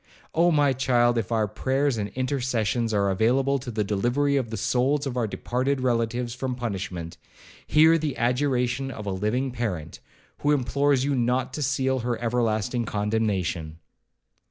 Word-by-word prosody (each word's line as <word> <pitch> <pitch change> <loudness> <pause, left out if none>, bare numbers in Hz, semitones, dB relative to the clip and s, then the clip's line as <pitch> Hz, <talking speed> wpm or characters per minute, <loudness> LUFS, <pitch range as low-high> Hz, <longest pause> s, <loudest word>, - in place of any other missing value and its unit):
Oh! 170 +2 +4
my 145 -4 +3
child, 120 -2 +2
if 110 0 -4
our 110 -2 +2
prayers 135 +5 0
and 105 0 -2
intercessions 125 -3 0
are 100 -2 +2
available 130 +7 +2
to 125 0 -7
the 110 -2 -1
delivery 120 +8 +1
of 130 -5 0
the 110 - -4
souls 135 +7 +1
of 135 -2 -3
our 120 -3 0
departed 130 +6 -1
relatives 120 -1 0
from 130 0 -3
punishment, 95 -8 -5 0.5
hear 160 +2 +5
the 150 -4 -2
adjuration 125 +1 0
of 105 -5 -7
a 100 - -2
living 110 +8 -1
parent, 100 -11 -4 0.4
who 145 +1 +2
implores 140 0 +1
you 145 - +1
not 125 +1 0
to 150 - -4
seal 130 -1 +1
her 120 -1 -2
everlasting 120 0 0
condemnation!' 105 -7 -1
125 Hz, 155 wpm, -25 LUFS, 110-135 Hz, 0.5 s, hear